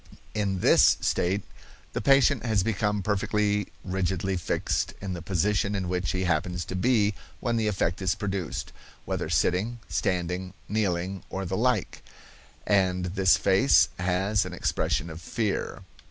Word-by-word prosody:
In 100 Hz, -3 st, -1 dB
this -, -, +6 dB
state 95 Hz, +3 st, 0 dB, 0.5 s
the -, -, -2 dB
patient 140 Hz, -2 st, +4 dB
has 110 Hz, -5 st, +1 dB
become 105 Hz, -1 st, 0 dB
perfectly 105 Hz, 0 st, 0 dB, 0.2 s
rigidly 95 Hz, 0 st, -1 dB
fixed 85 Hz, -, -1 dB
in 100 Hz, -2 st, -4 dB
the 85 Hz, -, -6 dB
position 100 Hz, +4 st, 0 dB
in 95 Hz, -2 st, -2 dB
which 90 Hz, 0 st, -1 dB
he 95 Hz, 0 st, -1 dB
happens 90 Hz, 0 st, -1 dB
to 95 Hz, -, -5 dB
be 105 Hz, 0 st, +2 dB, 0.3 s
when 120 Hz, -, -1 dB
the 110 Hz, -1 st, +1 dB
effect 95 Hz, -2 st, -1 dB
is 95 Hz, -1 st, +1 dB
produced, 95 Hz, -, -4 dB, 0.3 s
whether -, -, -3 dB
sitting, 105 Hz, +7 st, +1 dB
standing, 90 Hz, -1 st, -2 dB
kneeling, 95 Hz, -3 st, -1 dB
or 95 Hz, 0 st, -4 dB
the 95 Hz, +1 st, -2 dB
like; 120 Hz, -3 st, 0 dB, 0.6 s
and 90 Hz, -3 st, +1 dB
this 95 Hz, -2 st, +4 dB
face 95 Hz, -9 st, +4 dB
has 95 Hz, +3 st, +1 dB
an 90 Hz, -, -7 dB
expression 85 Hz, -, -1 dB
of 80 Hz, +1 st, -9 dB
fear. 105 Hz, +4 st, -2 dB
95 Hz, 145 wpm, -27 LUFS, 90-105 Hz, 0.6 s, this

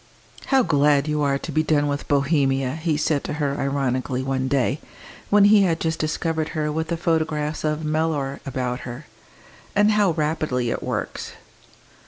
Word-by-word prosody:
"How 270 Hz, -2 st, +4 dB
glad 145 Hz, -4 st, +3 dB
you 150 Hz, 0 st, 0 dB
are 140 Hz, -1 st, +2 dB
to -, -, -7 dB
be 155 Hz, -, +2 dB
done 155 Hz, -2 st, +2 dB
with 145 Hz, 0 st, -3 dB
Bohemia!" 140 Hz, -2 st, +1 dB
he 160 Hz, -1 st, -1 dB
said 150 Hz, -1 st, 0 dB
to -, -, -3 dB
her 145 Hz, -2 st, -2 dB
ironically 130 Hz, -2 st, -1 dB
one 130 Hz, 0 st, -1 dB
day, 135 Hz, +1 st, +1 dB, 0.5 s
when 205 Hz, 0 st, +5 dB
he 205 Hz, 0 st, +6 dB
had 170 Hz, -4 st, +2 dB
just 160 Hz, -1 st, -1 dB
discovered 160 Hz, 0 st, -1 dB
her 150 Hz, -1 st, 0 dB
with 160 Hz, +1 st, -2 dB
the 170 Hz, -, -2 dB
photographs 155 Hz, -2 st, -1 dB
of 155 Hz, 0 st, -1 dB
Mellor 150 Hz, -3 st, -1 dB
about 125 Hz, -2 st, -3 dB
her. 125 Hz, +4 st, -8 dB, 0.7 s
"And 210 Hz, +1 st, +4 dB
how 205 Hz, -4 st, +3 dB
rapidly 150 Hz, -6 st, -1 dB
it -, -, -3 dB
works!" -, -, -4 dB
150 Hz, 170 wpm, -23 LUFS, 140-160 Hz, 0.7 s, he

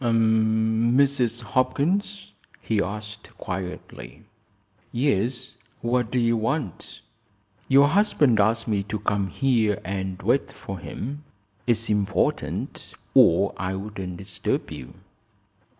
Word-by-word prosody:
"Mrs. 115 Hz, +2 st, +2 dB
Hopkins?" 150 Hz, -, 0 dB, 0.3 s
he 110 Hz, -3 st, 0 dB
asked, 105 Hz, +2 st, -6 dB
quietly. 90 Hz, -9 st, -7 dB, 0.7 s
"Yes. 125 Hz, 0 st, 0 dB, 0.3 s
What 120 Hz, -1 st, 0 dB
do 125 Hz, -, -1 dB
you 115 Hz, -1 st, +3 dB
want?" 115 Hz, -, -3 dB, 0.7 s
"Your 140 Hz, +2 st, +6 dB
husband 150 Hz, -, +3 dB
asked 110 Hz, +3 st, +2 dB
me 105 Hz, -3 st, +1 dB
to 105 Hz, +2 st, -4 dB
come 100 Hz, -1 st, 0 dB
here 110 Hz, -1 st, +1 dB
and 95 Hz, -1 st, -3 dB
wait -, -, +2 dB
for -, -, -7 dB
him. 145 Hz, +6 st, -6 dB, 0.4 s
It's 115 Hz, -1 st, +2 dB
important 105 Hz, -1 st, -1 dB, 0.2 s
or -, -, +5 dB
I 95 Hz, +1 st, -2 dB
wouldn't 95 Hz, -3 st, -6 dB
disturb 95 Hz, -1 st, -3 dB
you." 65 Hz, -, -9 dB
110 Hz, 105 wpm, -25 LUFS, 100-125 Hz, 0.7 s, Your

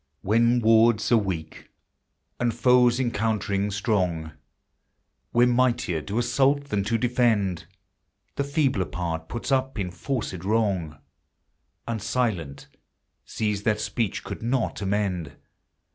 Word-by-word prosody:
When 115 Hz, +4 st, +3 dB
words 115 Hz, 0 st, +4 dB
are 120 Hz, -, +6 dB
weak 90 Hz, -7 st, -4 dB, 0.7 s
and 120 Hz, -1 st, +1 dB
foes 125 Hz, -1 st, +4 dB
encountering 105 Hz, -4 st, 0 dB
strong, 95 Hz, -6 st, -1 dB, 1.0 s
Where 120 Hz, +1 st, +4 dB
mightier 120 Hz, -9 st, +1 dB
do 100 Hz, +7 st, -4 dB
assault 135 Hz, +4 st, +1 dB
than 105 Hz, -1 st, 0 dB
do 115 Hz, +4 st, 0 dB
defend, 115 Hz, -7 st, +1 dB, 0.7 s
The 140 Hz, -, 0 dB
feebler 140 Hz, -, +1 dB
part 80 Hz, -2 st, -4 dB
puts 120 Hz, +3 st, -4 dB
up 135 Hz, -1 st, 0 dB
enforced 95 Hz, +1 st, -4 dB
wrong, 95 Hz, -8 st, 0 dB, 0.9 s
And 115 Hz, -2 st, -3 dB
silent 95 Hz, -, -2 dB, 0.6 s
sees 105 Hz, -2 st, -2 dB
that 105 Hz, 0 st, +1 dB
speech 110 Hz, -3 st, -2 dB
could -, -, -7 dB
not 120 Hz, -1 st, -1 dB
amend. 95 Hz, -6 st, -1 dB
110 Hz, 115 wpm, -25 LUFS, 95-120 Hz, 1.0 s, are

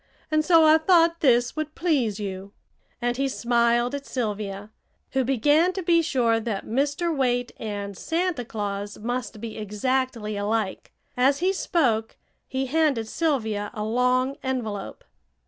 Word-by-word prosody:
And 310 Hz, 0 st, +3 dB
so 330 Hz, -1 st, +6 dB
I 310 Hz, +1 st, +6 dB
thought 335 Hz, 0 st, +4 dB
this 245 Hz, -3 st, +3 dB
would 310 Hz, -1 st, -4 dB
please 260 Hz, -, 0 dB
you," 195 Hz, 0 st, -6 dB, 0.5 s
and 245 Hz, 0 st, 0 dB
he 275 Hz, 0 st, +1 dB
smiled 240 Hz, -1 st, +1 dB
at 280 Hz, 0 st, -5 dB
Sylvia, 210 Hz, -3 st, -4 dB, 0.4 s
who 265 Hz, -1 st, +1 dB
began 290 Hz, +8 st, +3 dB
to 380 Hz, -, -4 dB
be 335 Hz, 0 st, +4 dB
sure 245 Hz, -8 st, +1 dB
that 215 Hz, -3 st, -4 dB
Mr. 285 Hz, +7 st, 0 dB
Waite 245 Hz, -2 st, 0 dB
and 205 Hz, -2 st, -5 dB
Santa 330 Hz, -, -1 dB
Claus 205 Hz, -2 st, -4 dB
must 230 Hz, -1 st, -4 dB
be 225 Hz, 0 st, -6 dB
exactly 215 Hz, +1 st, -1 dB
alike. 205 Hz, 0 st, -2 dB, 0.2 s
As 265 Hz, +3 st, +3 dB
he 370 Hz, +4 st, +1 dB
spoke 240 Hz, -, 0 dB, 0.3 s
he 265 Hz, 0 st, -2 dB
handed 275 Hz, -5 st, +1 dB
Sylvia 220 Hz, -10 st, -1 dB
a 210 Hz, -, -3 dB
long 250 Hz, +4 st, +1 dB
envelope. 230 Hz, -7 st, -4 dB
245 Hz, 145 wpm, -25 LUFS, 215-295 Hz, 0.5 s, so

